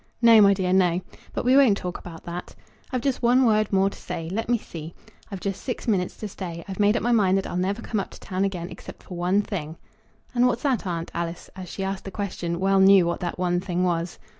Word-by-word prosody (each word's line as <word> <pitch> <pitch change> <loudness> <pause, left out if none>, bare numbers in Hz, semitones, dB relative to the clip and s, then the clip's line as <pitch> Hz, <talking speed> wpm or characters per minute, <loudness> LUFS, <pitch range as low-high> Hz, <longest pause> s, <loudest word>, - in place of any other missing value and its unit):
"No, 230 -2 +7
my 200 -1 +6
dear; 185 -1 0
no. 180 -2 +3 0.3
But - - -3
we 255 +1 +5
won't 260 -8 +6
talk 180 -2 -5
about 165 -2 -10
that. 175 +1 -7 0.4
I've 255 -2 -1
just 270 0 -1
one 250 +2 +4
word 215 -2 +2
more 195 0 +3
to 195 - -5
say. 165 0 -5
Let 225 +4 -3
me 240 - +4
see. 165 -6 -9 0.3
I've 195 -3 -6
just 195 -1 -3
six 250 - -5
minutes 190 -5 0
to 215 - -5
stay. 175 -4 -7
I've 190 0 -6
made 210 +2 +4
up - - -3
my 240 - +2
mind 195 -5 +4
that 195 - -1
I'll - - -5
never 195 +5 -1
come 215 - -1
up 195 - -4
to - - -13
town 190 0 -2
again, 180 -3 -2
except - - -11
for 180 - -9
one 180 +4 +1
thing." 165 -6 -5 0.6
"And 245 0 +4
what's 245 +1 -1
that, 260 -8 0
aunt?" 170 -1 -3
Alice, 170 0 -4
as 185 -2 -8
she 195 - -5
asked 195 0 -3
the - - -4
question, 180 -4 -3
well 195 +1 +3
knew 190 -1 +7
what 170 0 -1
that 175 -2 -3
one 175 -1 +1
thing 180 -1 -1
was. 170 -1 -1
190 Hz, 250 wpm, -25 LUFS, 175-215 Hz, 0.6 s, No